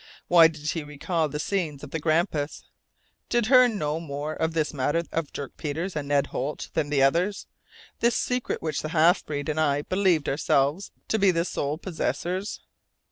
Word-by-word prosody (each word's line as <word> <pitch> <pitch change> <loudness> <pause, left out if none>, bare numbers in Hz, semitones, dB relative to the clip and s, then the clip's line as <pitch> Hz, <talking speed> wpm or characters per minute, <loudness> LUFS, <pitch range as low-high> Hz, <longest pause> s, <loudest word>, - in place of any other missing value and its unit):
Why 170 -2 +8
did 155 -1 -4
he 165 - -3
recall 150 +2 -2
the 150 +1 -4
scenes 155 -6 -2
of 145 - -9
the 160 - -2
Grampus? 155 -1 0 0.7
Did 240 -2 +2
Hearne 250 -2 +5
know 150 -2 -1
more 150 -1 -4
of 160 +1 -1
this 155 -2 0
matter 145 +4 0
of 165 -2 -2
Dirk 140 -2 -7
Peters 160 +5 -3
and 145 -2 -3
Ned 140 -1 +2
Holt 140 +4 -3
than 150 -2 0
the 140 -2 +3
others; 175 +9 +1 0.5
this 235 0 +2
secret 250 -1 -1
of - - -13
which 155 -2 -2
the 155 - -4
half 170 +4 +5
breed 145 -2 -4
and 155 0 -1
I 145 -2 +2
believed 185 -5 +1
ourselves 145 +5 +1 0.2
to 220 - +1
be 200 -1 +5
the 170 -1 +1
sole 145 -3 -2
possessors? 185 +2 -3
155 Hz, 190 wpm, -26 LUFS, 145-180 Hz, 0.7 s, Why